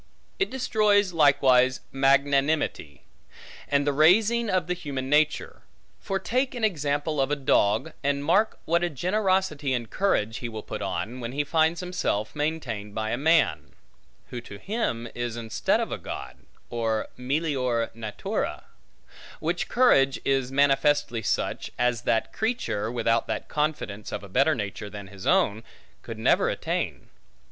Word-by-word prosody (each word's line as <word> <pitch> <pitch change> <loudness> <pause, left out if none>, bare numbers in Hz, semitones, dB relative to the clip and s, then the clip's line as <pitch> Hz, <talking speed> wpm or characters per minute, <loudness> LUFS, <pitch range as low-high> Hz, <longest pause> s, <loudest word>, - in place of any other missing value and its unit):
It 395 - +1
destroys 210 -6 +2
likewise 135 -4 +4
magnanimity, 140 - +1 0.6
and 140 0 +1
the 145 - +1
raising 215 +10 +4
of 185 -2 +1
human 145 -7 -4
nature; 150 0 +1 0.4
for 195 - -2
take 250 +7 -1
an 240 - -5
example 145 -5 0
of 135 - +1
a 145 - +1
dog, 130 0 +1
and 140 0 0
mark 200 +7 +2
what 170 +2 +2
a 175 - +1
generosity 185 - 0
and 120 -2 -3
courage 110 - 0
he 120 - -5
will 110 -1 -7
put - - -6
on, 120 +4 -3
when 120 0 -5
he 145 +2 0
finds 160 +3 +1
himself 180 - -2
maintained 130 -10 -3
by 110 0 -2
a - - +1
man; 135 - +2 0.6
who 120 - -5
to 100 -4 -10
him 120 - -2
is 120 -1 -4
instead 115 -1 0
of - - -3
a - - -3
God, - - -7 0.3
or 115 -2 -1
melior 125 -4 -1
natura; 110 -2 -4 0.8
which 170 +3 -2
courage 135 - +4
is 135 -2 +1
manifestly 135 -3 +2
such, 100 - -2
as 120 -1 +1
that 115 -2 0
creature, 220 - -1
without 115 -1 +1
that - - -3
confidence 150 -9 -2
of 105 - -5
a - - -9
better 135 +10 +3
nature 105 -1 -5
than 100 -1 -9
his 95 -1 -8
own, 105 +2 +2 0.4
could 115 - -8
never 110 - +3
attain. - - -3
140 Hz, 150 wpm, -26 LUFS, 115-165 Hz, 0.8 s, likewise